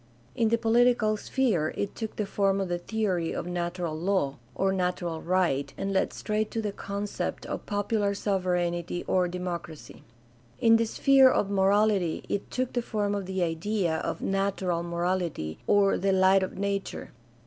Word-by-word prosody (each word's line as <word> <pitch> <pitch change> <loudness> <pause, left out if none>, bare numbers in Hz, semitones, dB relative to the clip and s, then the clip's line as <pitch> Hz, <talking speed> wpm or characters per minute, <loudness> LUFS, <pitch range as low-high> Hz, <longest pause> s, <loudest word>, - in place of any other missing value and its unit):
In 230 -2 +2
the 230 - +3
political 230 -1 +3
sphere 210 - 0
it 200 - -2
took 220 -2 -5
the 210 - -1
form 195 0 +1
of 190 -2 -2
the 175 0 -1
theory 185 -4 -1
of - - -4
"natural 175 -1 -3
law" 165 -5 0 0.2
or 195 0 +1
"natural 180 -3 -2
right" 170 -6 +1
and 195 0 -2
led 190 - +1
straight 215 0 -2
to 225 - -3
the 210 -2 -2
concept 200 +1 -4
of - - -5
popular 205 0 0
sovereignty 175 -3 -1
or 180 -1 +2
democracy. 175 -3 -6 0.6
In 225 0 +6
the 230 0 +1
sphere 270 +3 +5
of 200 -5 +1
morality 200 -2 +2
it 200 - -2
took 255 -1 -2
the 245 - 0
form 210 -3 -1
of 200 -2 -3
the 190 -1 -1
idea 170 +1 0
of - - -3
"natural 195 -3 0
morality" 170 - -2
or 200 -1 +4
the 195 0 +1
"light 190 0 +5
of 190 - -4
nature." 200 0 -3
195 Hz, 165 wpm, -27 LUFS, 175-210 Hz, 0.6 s, In